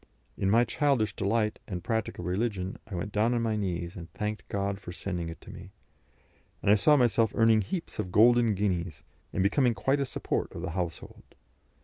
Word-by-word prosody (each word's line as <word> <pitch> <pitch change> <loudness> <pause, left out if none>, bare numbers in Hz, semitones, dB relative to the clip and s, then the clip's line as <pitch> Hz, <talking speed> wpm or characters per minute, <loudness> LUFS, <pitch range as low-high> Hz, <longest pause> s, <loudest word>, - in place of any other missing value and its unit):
In 95 - 0
my 115 +4 +5
childish 120 -4 +1
delight 105 +2 0
and 90 -3 -5
practical 110 -6 -2
religion, 95 0 -2
I 105 - -6
went 105 +4 -4
down 110 +4 +2
on 120 - 0
my 110 -1 0
knees 90 -4 -3
and 85 -2 -9
thanked 105 0 -4
God 100 0 -2
for 90 - -8
sending 90 -2 -4
it 80 - -8
to - - -11
me, - - -10 0.9
and 100 - +4
I - - +8
saw 150 +9 +5
myself 115 -3 +3
earning 115 -1 +5
heaps 165 - -5
of 90 - -3
golden 115 +1 +5
guineas, 90 -5 -2 0.3
and 95 - 0
becoming 120 +4 +3
quite 135 +7 +1
a 140 - +1
support - - -2
of 85 - -6
the 95 - -3
household. 85 -1 -6
105 Hz, 195 wpm, -29 LUFS, 90-115 Hz, 0.9 s, I